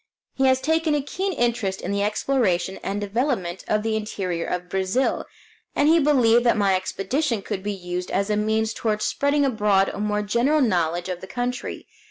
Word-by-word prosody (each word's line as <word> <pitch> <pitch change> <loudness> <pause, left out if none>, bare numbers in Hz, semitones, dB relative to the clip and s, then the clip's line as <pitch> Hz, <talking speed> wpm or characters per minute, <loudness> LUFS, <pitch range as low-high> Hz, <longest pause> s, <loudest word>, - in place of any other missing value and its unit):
He 265 - +1
has 260 0 +4
taken 320 -1 +1
a 290 - +1
keen 385 +7 -2
interest 235 - -1
in - - -4
the 200 0 0
exploration 205 -4 0
and 200 +1 -3
development 205 -4 -2
of 210 0 +1
the 220 -1 0
interior 190 -5 -3
of 180 0 -3
Brazil, 190 +8 0 0.5
and 290 - +3
he 330 +2 +6
believed 245 -6 +4
that 235 -2 +3
my 200 -2 +3
expedition 205 +6 -1
could 200 -3 -4
be 205 +2 -2
used 180 -2 -5
as 200 +2 0
a - - +2
means 220 +1 0
toward 215 -2 -1
spreading 285 0 +1
abroad 210 -6 +2
a - - -6
more 210 0 0
general 235 +9 +2
knowledge 175 -6 +1
of 180 -1 -4
the 190 - -8
country. 250 +2 -4
215 Hz, 190 wpm, -23 LUFS, 190-255 Hz, 0.5 s, he